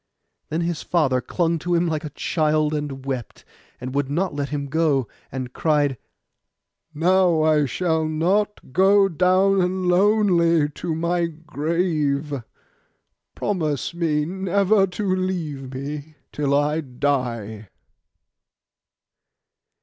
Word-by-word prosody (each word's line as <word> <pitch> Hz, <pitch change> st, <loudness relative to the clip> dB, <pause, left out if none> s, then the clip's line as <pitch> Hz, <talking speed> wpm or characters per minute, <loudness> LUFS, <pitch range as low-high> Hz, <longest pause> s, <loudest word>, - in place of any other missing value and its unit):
Then 160 Hz, +2 st, -1 dB
his 170 Hz, -2 st, -2 dB
father 135 Hz, -7 st, +1 dB
clung 170 Hz, +1 st, 0 dB
to 175 Hz, +2 st, -1 dB
him 170 Hz, +1 st, +2 dB
like 160 Hz, -3 st, -2 dB
a 155 Hz, -, -5 dB
child, 155 Hz, 0 st, 0 dB
and 145 Hz, -3 st, -4 dB
wept, 130 Hz, -4 st, -5 dB, 0.3 s
and 130 Hz, +1 st, -6 dB
would 140 Hz, -1 st, 0 dB
not 175 Hz, +6 st, -1 dB
let 145 Hz, -1 st, -3 dB
him 145 Hz, -1 st, -3 dB
go; 140 Hz, -4 st, +1 dB, 0.2 s
and 130 Hz, -1 st, -5 dB
cried, 145 Hz, -4 st, +1 dB, 1.0 s
'Now 170 Hz, 0 st, +3 dB
I 155 Hz, -2 st, +3 dB
shall 160 Hz, +3 st, 0 dB
not 180 Hz, +1 st, 0 dB
go 195 Hz, +2 st, +5 dB
down 185 Hz, +1 st, +2 dB
lonely 180 Hz, -5 st, +3 dB
to 160 Hz, +2 st, -4 dB
my 170 Hz, +1 st, 0 dB
grave. 155 Hz, -2 st, -1 dB, 1.0 s
Promise 160 Hz, -7 st, -2 dB
me 155 Hz, -3 st, 0 dB
never 195 Hz, +3 st, +2 dB
to 185 Hz, +1 st, -1 dB
leave 160 Hz, -8 st, -3 dB
me 145 Hz, +3 st, -6 dB, 0.2 s
till 140 Hz, -1 st, 0 dB
I 150 Hz, +2 st, +1 dB
die. 120 Hz, -, -2 dB
160 Hz, 115 wpm, -23 LUFS, 145-180 Hz, 1.0 s, go